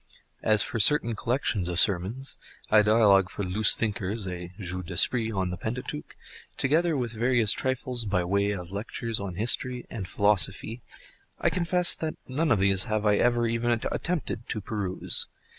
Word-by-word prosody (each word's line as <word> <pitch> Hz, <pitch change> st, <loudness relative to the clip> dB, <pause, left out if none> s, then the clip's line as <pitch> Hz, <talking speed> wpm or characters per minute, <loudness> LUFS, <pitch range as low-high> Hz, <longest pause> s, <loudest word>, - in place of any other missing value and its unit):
As 110 Hz, -1 st, +2 dB
for 115 Hz, -, -4 dB
certain 120 Hz, -1 st, +3 dB
collections 110 Hz, -6 st, -1 dB
of 85 Hz, -1 st, -1 dB
sermons, 100 Hz, +10 st, 0 dB, 0.3 s
a 110 Hz, 0 st, +6 dB
dialogue 105 Hz, -3 st, +4 dB
for 100 Hz, -, -5 dB
loose 100 Hz, +3 st, +5 dB
thinkers, 105 Hz, -1 st, -2 dB
a 90 Hz, -1 st, -7 dB
jeu 90 Hz, -1 st, -4 dB
d'esprit 110 Hz, +6 st, +1 dB
on 95 Hz, -3 st, -2 dB
the 90 Hz, -, -5 dB
Pentateuch, 125 Hz, +8 st, -6 dB, 0.4 s
together 160 Hz, +3 st, +1 dB
with 120 Hz, -3 st, -3 dB
various 120 Hz, -1 st, +1 dB
trifles 130 Hz, -2 st, +1 dB
by 95 Hz, -3 st, 0 dB
way 100 Hz, +3 st, 0 dB
of 90 Hz, -3 st, -5 dB
lectures 115 Hz, +2 st, -4 dB
on 100 Hz, -3 st, -6 dB
history 120 Hz, +4 st, -1 dB
and 100 Hz, -5 st, -6 dB
philosophy, 105 Hz, +3 st, 0 dB, 0.6 s
I -, -, +1 dB
confess 180 Hz, 0 st, +4 dB
that 160 Hz, -1 st, -4 dB
none 150 Hz, +5 st, -1 dB
of 110 Hz, -, +4 dB
these 95 Hz, 0 st, +2 dB
have 110 Hz, 0 st, -2 dB
I 105 Hz, -1 st, +3 dB
ever 120 Hz, -1 st, +2 dB
even 115 Hz, +1 st, -1 dB, 0.2 s
attempted 165 Hz, -9 st, -3 dB
to 110 Hz, -, -2 dB
peruse. 100 Hz, -3 st, 0 dB
110 Hz, 160 wpm, -26 LUFS, 95-120 Hz, 0.6 s, a